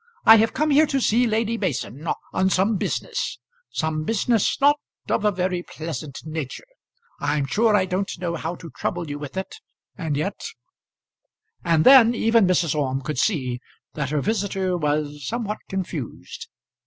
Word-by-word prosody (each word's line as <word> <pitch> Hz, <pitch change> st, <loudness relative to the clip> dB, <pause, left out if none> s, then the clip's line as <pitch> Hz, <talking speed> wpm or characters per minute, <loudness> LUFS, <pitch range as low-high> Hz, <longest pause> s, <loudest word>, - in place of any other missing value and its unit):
"I 225 Hz, -, +10 dB
have 225 Hz, +1 st, +2 dB
come 305 Hz, +2 st, +1 dB
here 300 Hz, +2 st, +5 dB
to 275 Hz, -2 st, 0 dB
see 245 Hz, 0 st, +3 dB
Lady 225 Hz, +1 st, 0 dB
Mason 135 Hz, -, -3 dB, 0.3 s
on 190 Hz, +1 st, +2 dB
some 195 Hz, +4 st, +2 dB
business -, -, -2 dB, 0.3 s
some 155 Hz, -1 st, -2 dB
business 225 Hz, +3 st, +1 dB
not 290 Hz, +1 st, +4 dB, 0.3 s
of 215 Hz, -, +1 dB
a 210 Hz, -, +3 dB
very 180 Hz, -1 st, -1 dB
pleasant 155 Hz, -5 st, -7 dB
nature. 155 Hz, -, -5 dB, 0.5 s
I'm 145 Hz, -2 st, 0 dB
sure 215 Hz, +10 st, +2 dB
I 190 Hz, -2 st, +3 dB
don't 190 Hz, +1 st, -2 dB
know 170 Hz, -1 st, -3 dB
how 165 Hz, +1 st, -4 dB
to 165 Hz, -2 st, -11 dB
trouble 170 Hz, -4 st, -3 dB
you 145 Hz, -, -5 dB
with 145 Hz, +4 st, -7 dB
it, 190 Hz, -, -5 dB, 0.4 s
and 160 Hz, -6 st, -2 dB
yet 195 Hz, +7 st, -3 dB, 0.6 s
" -, -, -44 dB
And 165 Hz, -2 st, +3 dB
then 245 Hz, -3 st, +8 dB
even 225 Hz, -3 st, +3 dB
Mrs. 175 Hz, -4 st, +2 dB
Orme 135 Hz, -3 st, -1 dB
could 125 Hz, 0 st, -3 dB
see 130 Hz, -, 0 dB, 0.3 s
that 140 Hz, -3 st, -3 dB
her 150 Hz, -1 st, 0 dB
visitor 195 Hz, -2 st, -1 dB
was 150 Hz, -2 st, -1 dB
somewhat 215 Hz, -2 st, -3 dB
confused. 195 Hz, -, -5 dB
180 Hz, 165 wpm, -23 LUFS, 150-220 Hz, 0.6 s, I